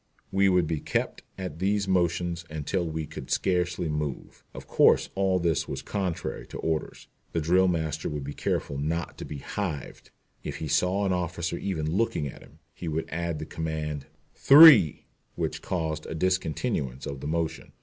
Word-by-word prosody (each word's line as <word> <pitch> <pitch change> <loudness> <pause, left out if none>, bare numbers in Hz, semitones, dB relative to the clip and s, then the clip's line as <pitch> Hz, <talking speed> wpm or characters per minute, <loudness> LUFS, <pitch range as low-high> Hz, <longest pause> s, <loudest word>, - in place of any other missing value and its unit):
We 95 0 +4
would 90 -2 +3
be 80 -1 -2
kept - - -2 0.2
at 90 -5 -6
these 100 +1 +1
motions 85 -2 0
until 80 +4 -2
we 80 0 -3
could - - -9
scarcely 90 -2 0
move. 75 -3 -4
Of - - -10
course - - +4
all 95 -1 +2
this 85 -5 0
was - - -5
contrary 95 -5 -3
to - - -8
orders. 80 -1 -3 0.3
The 85 - +1
drill 90 +4 +3
master 80 -3 -1
would 75 -2 -4
be 70 +1 -5
careful 70 -1 -2
not 80 +3 -2
to - - -5
be 75 - -6
"hived." 80 -1 -5 0.3
If - - -4
he 80 - -4
saw 90 +7 +2
an 95 - +1
officer 85 -1 -2
even 85 -6 -2
looking 100 -5 0
at 70 - -7
him, 75 - -17 0.2
he 85 - -7
would 80 +1 -2
add 85 0 -2
the 75 - -5
command 75 -3 -4 0.3
"three," 140 - +8 0.3
which - - -3
caused 80 -3 -3
a - - -5
discontinuance 80 - -1
of 70 -1 -5
the 70 - -5
motion. 80 +1 -2
85 Hz, 175 wpm, -27 LUFS, 75-95 Hz, 0.3 s, three